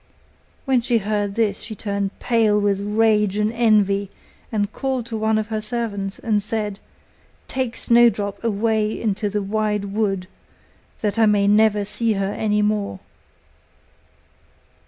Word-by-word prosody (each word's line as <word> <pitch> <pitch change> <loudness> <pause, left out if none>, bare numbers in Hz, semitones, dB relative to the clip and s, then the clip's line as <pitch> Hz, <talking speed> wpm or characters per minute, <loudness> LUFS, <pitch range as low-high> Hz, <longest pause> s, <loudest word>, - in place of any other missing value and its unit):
When 260 -3 +2
she 235 0 +1
heard 205 -1 -1
this 215 -3 +1
she 220 -1 -7
turned 200 -1 -3
pale 225 -3 +2
with 200 -1 +1
rage 210 -1 +2
and 210 +1 0
envy, 205 -4 +2 0.4
and 210 -2 -1
called 265 -3 -2
to 230 -1 -5
one 220 0 +1
of 215 0 -2
her 215 -1 -2
servants, 210 -4 -3
and 215 -3 0
said, 210 -1 -3 0.7
'Take 260 -2 -2
Snowdrop 235 -4 +2
away 220 0 0
into 210 -1 -1
the 205 0 -2
wide 210 0 -1
wood, 195 -4 0 0.8
that 210 +1 -1
I 220 - +5
may 205 -1 +3
never 210 0 +3
see 225 +2 0
her 195 0 -2
any 210 -1 0
more. 210 -2 -1
210 Hz, 140 wpm, -21 LUFS, 205-225 Hz, 0.8 s, I